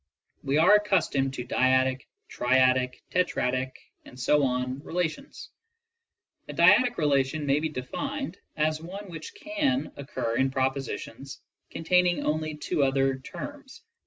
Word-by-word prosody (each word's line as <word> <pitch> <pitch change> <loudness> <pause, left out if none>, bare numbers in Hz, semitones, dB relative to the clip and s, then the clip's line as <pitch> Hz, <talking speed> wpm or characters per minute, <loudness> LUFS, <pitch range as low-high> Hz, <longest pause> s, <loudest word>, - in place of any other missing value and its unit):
We 140 +1 0
are 175 +6 +6
accustomed 170 -10 +2
to 125 - -5
dyadic, 130 +1 +2 0.2
triadic, 130 0 +2
tetradic... 130 -8 0 1.1
relations. 180 - -4 1.0
A - - -5
dyadic 245 -2 +5
re 155 - 0
lation 140 +1 +1
may 140 +1 +2
be 160 +1 -1
defined 275 - -5 0.2
as 155 0 0
one 190 +3 -8
which 160 -2 -8
can 295 -3 -1
occur 120 -4 -3
in 135 0 +2
propositions 135 -1 -4 0.3
contain 180 +2 +2
ing 175 - -1
only 155 0 -1
two 150 0 -2
other 135 -1 +2
terms, 280 - -9
i. - - -51
150 Hz, 125 wpm, -27 LUFS, 130-180 Hz, 1.1 s, are